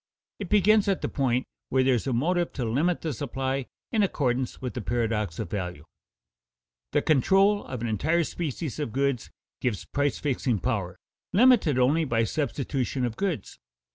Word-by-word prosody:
It 200 -4 -5
begins 210 +1 +4
at 195 -2 +1
the - - +1
point 130 -3 0 0.2
where 130 0 +3
there 130 0 +4
is 120 +2 -1
a - - +1
motive 170 +8 +1
to 125 - -2
limit 150 +10 +1
the 160 -3 -2
supply 135 +1 -3 0.2
in 220 - +2
accordance 130 -9 0
with 125 -2 -4
the 125 - -4
paradox 110 -6 -1
of - - -5
value. 90 -7 -4 1.1
The - - +2
control 195 +8 +4
of 125 -3 -6
an 120 - -1
entire 160 - +1
species 155 -2 -4
of 145 -7 -3
goods 135 -2 0 0.3
gives 120 -6 -2
price 145 -1 0
fixing 130 -5 0
power, 100 -6 -2 0.4
limited 215 - +5
only 140 +6 +3
by 115 -4 +1
substitution 135 0 -1
of 115 -2 -3
goods. 175 - -3
135 Hz, 170 wpm, -27 LUFS, 120-165 Hz, 1.1 s, limited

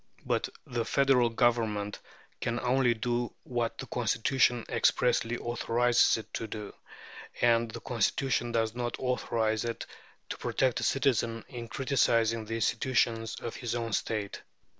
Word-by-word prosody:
But - - 0 0.2
the 120 -1 -2
Federal 130 -1 +3
Government 115 -3 +1 0.4
can 120 +1 -1
only 125 -1 +3
do 120 +1 -1
what 120 -2 -2
the 135 - -6
Constitution 120 0 +1
expressly 120 -1 +2
authorizes 120 0 +2
it 110 -1 -10
to 115 - -3
do, 105 -1 -7 0.7
and 115 -1 +3
the - - -8
Constitution 120 +1 0
does 115 -1 0
not 120 0 -3
authorize 115 -4 0
it 115 -1 -4 0.4
to - - -5
protect 130 -3 +1
a - - -3
citizen 115 -5 +1
in 120 -3 -7
criticizing 115 -4 +1
the 115 - -4
institutions 115 -1 +1
of 115 - -5
his 120 -2 -3
own 115 -2 -3
State. 105 -2 -2
120 Hz, 140 wpm, -30 LUFS, 115-125 Hz, 0.7 s, Federal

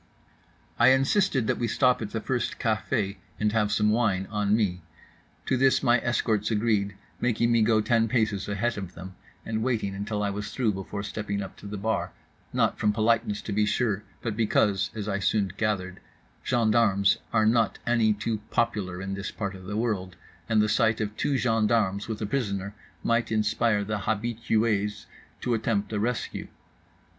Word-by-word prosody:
I 120 - +6
insisted 135 - +3
that - - 0
we 120 - 0
stop 125 +2 +2
at 105 - -3
the 110 - -3
first 120 +1 -2
café 105 -2 -1 0.2
and 105 0 +2
have 105 -1 +1
some 105 0 +3
wine 105 -5 +1
on 105 -1 +2
me. 95 -5 0 0.6
To 130 - +1
this 130 +1 +3
my 120 0 +4
escorts 110 -3 0
agreed, 105 -3 +1 0.2
making 120 -1 +1
me 115 -1 +4
go 110 0 +4
ten 115 0 +2
paces 110 -4 0
ahead 105 +3 -1
of 95 -2 -7
them, 95 +2 -9 0.3
and 110 -1 -2
waiting 110 -5 -1
until 105 +1 -3
I 100 - 0
was 105 +1 -4
through 115 -5 +1
before 95 +1 -5
stepping 100 -1 -3
up 95 - -9
to - - -10
the 105 +1 -5
bar—not 110 +3 -2
from 105 - +3
politeness, 110 -1 +1
to - - -5
be 105 +1 +2
sure, 105 -3 0 0.2
but 115 -4 -2
because 105 -3 +2
(as 105 -2 -4
I 100 -1 -1
soon 100 -1 +1
gathered) 95 -4 -2 0.4
gendarmes 110 -5 +3
were 110 -1 +3
not 115 -1 +2
any 115 -2 +3
too 110 +1 -2
popular 95 -6 -1
in 95 0 -4
this 100 +1 -4
part 100 -2 -4
of 95 -1 -11
the 105 +2 -4
world, 100 -6 -2 0.3
and 110 -2 +4
the - - +2
sight 110 +1 +2
of 105 -1 -3
two 140 +3 0
gendarmes 110 -4 +1
with 110 -2 -4
a - - 0
prisoner 100 -4 -2 0.3
might 115 0 +1
inspire 110 0 +1
the 105 +1 -2
habitués 110 -1 0 0.4
to 125 - 0
attempt 110 -2 -1
a 105 - 0
rescue. 120 +3 -2
105 Hz, 175 wpm, -27 LUFS, 100-115 Hz, 0.6 s, I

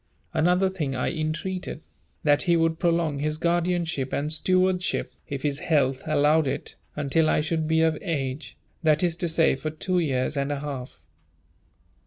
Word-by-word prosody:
Another 180 +4 +3
thing 155 -8 -3
I 125 - -1
entreated, 165 +2 -3 0.4
that 145 -1 +4
he 175 -2 +3
would 165 0 +1
prolong 165 -4 +1
his 155 +1 -1
guardianship, 170 -4 0
and 150 +2 -1
stewardship, 185 +3 +1
if 140 -2 -5
his 145 -1 -1
health 135 -5 +1
allowed 155 0 +3
it, - - -4 0.2
until 150 +2 +1
I - - +3
should 160 0 -1
be 160 0 +3
of 160 -1 +2
age, 140 -5 -3 0.2
that 155 0 +3
is 170 -2 +2
to 175 - -1
say, 160 -2 +3
for 155 +3 -4
two 180 +4 -1
years 135 -3 0
and 140 +1 -1
a 145 - -1
half. 135 - -6
155 Hz, 165 wpm, -25 LUFS, 145-170 Hz, 0.4 s, that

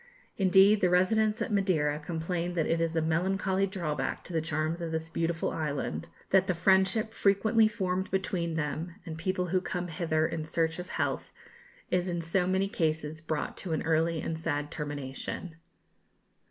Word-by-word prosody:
Indeed, 195 +2 +5
the 180 - +4
residents 215 +5 +3
at 230 - -4
Madeira 160 -7 +2
complain 170 +3 -3
that 165 -3 +1
it 165 0 +1
is 165 0 0
a 160 - +2
melancholy 190 +4 +1
drawback 155 -8 -3
to 180 - -9
the 160 - +1
charms 155 +2 -1
of 165 -1 -3
this 160 0 -3
beautiful 165 0 -1
island, 140 - -3 0.2
that 190 0 +5
the 185 - +1
friendship 190 +5 +3
frequently 215 +2 +4
formed 190 -4 -2
between 180 -3 -1
them 160 +2 -2
and 160 - -5
people 180 +2 -1
who 185 +1 +2
come 180 -1 -3
hither 160 -1 0
in 165 -1 -2
search 160 +1 -1
of 180 - -6
health, - - -2 0.6
is 180 0 +1
in 175 -1 -1
so 180 +2 +1
many 190 +1 +2
cases 155 -4 -1
brought 155 -1 -3
to 175 -4 -4
an 155 - -1
early 160 0 +1
and 160 -1 -3
sad 150 -2 -2
termination. 145 +3 -5
170 Hz, 170 wpm, -29 LUFS, 160-190 Hz, 0.6 s, Indeed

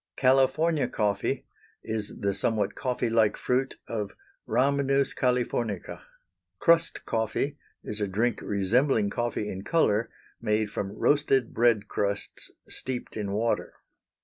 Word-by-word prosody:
California 135 +4 +3
coffee 100 -2 -1 0.4
is 110 -2 -4
the 100 0 +1
somewhat 100 +1 0
coffee 125 -2 -1
like 110 -2 +3
fruit 130 +2 0
of 105 -3 -3 0.3
Rhamnus 140 +3 +2
Californica. 125 -3 -1 0.6
Crust 170 -1 +3
coffee 115 +6 -1 0.2
is 105 0 -5
a 105 - +1
drink 110 +4 0
resembling 105 +2 +2
coffee 120 -3 -2
in 95 -1 -5
color, 115 -9 +2 0.3
made 105 -2 0
from 100 -2 -3
roasted 135 -4 +2
bread 115 -3 +3
crusts 100 0 -2 0.2
steeped 130 -2 -4
in 105 -2 -3
water. 115 +3 -1
115 Hz, 120 wpm, -27 LUFS, 105-130 Hz, 0.6 s, California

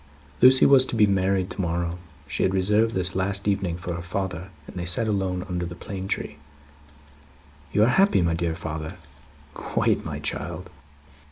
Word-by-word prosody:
Lucie 130 +1 +7
was 135 -2 +7
to 130 - -4
be 110 -2 +5
married 95 -1 +1
to - - -3
morrow. 85 0 -2 0.3
She 70 - -4
had 95 - +2
reserved 105 +4 +2
this 90 0 0
last 100 +2 -1
evening 95 -4 0
for 90 0 -5
her 85 - -5
father, 90 +1 -4 0.2
and - - -12
they 90 - -4
sat 90 +6 +1
alone 95 -3 -1
under 90 -2 -3
the 85 0 -6
plane 95 +1 -6
tree. 75 - -3 1.3
"You 105 - +3
are 130 +11 +3
happy, 195 - +4
my 85 -1 +1
dear 85 -1 -1
father?" 80 +1 -6 0.6
"Quite, - - 0
my - - -5
child." - - -5
95 Hz, 175 wpm, -25 LUFS, 85-100 Hz, 1.3 s, Lucie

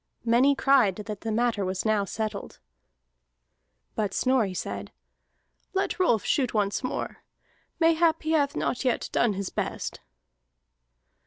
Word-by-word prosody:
Many 250 +5 +4
cried 260 -9 +4
that 210 -1 -7
the 225 - -3
matter 230 -2 +1
was 185 +1 -2
now 215 -2 +2
settled. 215 0 -5 1.4
But 205 -3 -2
Snorri 240 -8 +1
said: - - -5 0.8
"Let 380 - -1
Rolf 240 - +2
shoot 255 -5 +1
once 205 +3 0
more. 255 - -3 0.6
Mayhap 330 0 +3
he 315 - -1
hath 290 -3 +2
not 250 - -1
yet 255 -2 0
done 235 -3 +2
his 195 -1 -4
best." - - -4
230 Hz, 130 wpm, -27 LUFS, 205-275 Hz, 1.4 s, Many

